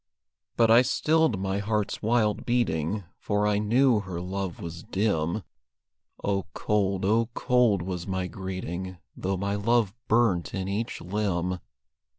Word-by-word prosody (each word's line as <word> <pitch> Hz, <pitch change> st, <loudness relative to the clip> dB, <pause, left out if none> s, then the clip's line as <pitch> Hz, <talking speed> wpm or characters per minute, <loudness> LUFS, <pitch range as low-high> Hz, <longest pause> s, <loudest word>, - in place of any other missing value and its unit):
But 115 Hz, -1 st, +5 dB
I 115 Hz, +2 st, +8 dB
stilled 150 Hz, -2 st, +2 dB
my 95 Hz, +1 st, -1 dB
heart's 105 Hz, 0 st, -1 dB
wild 110 Hz, -1 st, +2 dB
beating, 105 Hz, -5 st, 0 dB, 0.2 s
For 105 Hz, 0 st, 0 dB
I 105 Hz, -1 st, +2 dB
knew 120 Hz, +2 st, +4 dB
her 95 Hz, -4 st, -5 dB
love 95 Hz, 0 st, -4 dB
was 85 Hz, 0 st, -6 dB
dim; 95 Hz, -1 st, 0 dB, 0.8 s
Oh, 100 Hz, -1 st, 0 dB
cold, 100 Hz, -2 st, 0 dB
oh, 115 Hz, +3 st, +2 dB
cold 125 Hz, -7 st, +3 dB
was 90 Hz, -1 st, -4 dB
my 95 Hz, -1 st, -1 dB
greeting, 95 Hz, 0 st, -5 dB, 0.2 s
Though 95 Hz, +1 st, -2 dB
my 100 Hz, +2 st, -1 dB
love 105 Hz, 0 st, +2 dB
burnt 110 Hz, -7 st, +2 dB
in 95 Hz, -1 st, -2 dB
each 105 Hz, +4 st, -3 dB
limb. 90 Hz, -2 st, -1 dB
100 Hz, 140 wpm, -27 LUFS, 95-110 Hz, 0.8 s, I